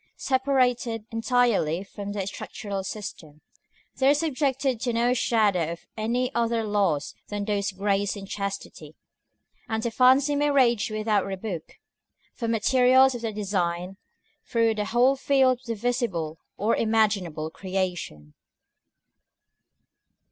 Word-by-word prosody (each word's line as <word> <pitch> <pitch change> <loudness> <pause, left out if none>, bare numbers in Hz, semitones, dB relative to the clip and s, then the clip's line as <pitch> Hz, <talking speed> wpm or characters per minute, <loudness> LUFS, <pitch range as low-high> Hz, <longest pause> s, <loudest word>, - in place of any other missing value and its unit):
Separated 255 -4 +1
entirely 225 -8 +1
from 200 0 -7
the 200 -2 -2
structural 200 0 -5
system, 165 -7 -8 0.6
they 265 0 +4
are 285 - +5
subjected 275 -4 0
to 240 0 -1
no 240 +2 +2
shadow 205 -9 +1
of 170 - -13
any 240 +4 -1
other 230 -1 0
laws 200 -9 0
than 205 -1 -4
those 205 -1 -1
of 190 - -23
grace 200 0 0
and 195 -1 -8
chastity; 200 0 -6 0.7
and 220 0 -1
the 235 - -1
fancy 260 +5 +4
may 290 +1 +2
range 245 -7 +3
without 215 -2 0
rebuke, 190 -4 -6 0.6
for 230 - -4
materials 255 +3 +4
of 240 - -6
their 225 -1 -2
design, 190 -3 -2 0.5
through 230 -1 +1
the 210 -1 -2
whole 245 +5 +3
field 265 -2 +3
of 255 - -23
the 230 -1 -3
visible 205 - -2 0.2
or 215 +3 +1
imaginable 200 -8 0
creation. 180 - -4
220 Hz, 130 wpm, -26 LUFS, 195-250 Hz, 0.7 s, are